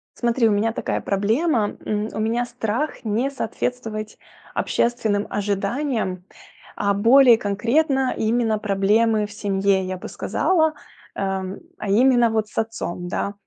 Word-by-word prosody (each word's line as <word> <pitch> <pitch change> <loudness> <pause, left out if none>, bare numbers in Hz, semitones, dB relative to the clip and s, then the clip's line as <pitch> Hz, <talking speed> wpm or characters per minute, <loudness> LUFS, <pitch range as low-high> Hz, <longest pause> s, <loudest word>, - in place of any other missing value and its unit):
Смотри, 235 -1 +2
у - - +2
меня 210 +2 +1
такая - - -2
проблема. 215 - +1
М, 210 +1 -1
у - - -4
меня 230 +3 0
страх 240 +6 -3
не 225 +5 0
соответствовать 225 -4 -4 0.4
общественным 220 -4 0
ожиданиям. 205 0 -2 0.5
А 200 -1 +1
более 235 +4 +6
конкретно- 260 +7 +1
именно 220 -1 +1
проблемы 210 +2 +2
в 205 - -10
семье, 195 -1 +1
я 185 0 -4
бы - - -8
сказала. 320 -4 +1 0.4
Э, - - -4 0.2
м, 190 +1 -6 0.2
а 205 - -4
именно 240 +3 +4
вот 220 -1 0
с - - -19
отцом, 215 -6 -3
да. 200 +2 -2
220 Hz, 140 wpm, -22 LUFS, 205-240 Hz, 0.5 s, более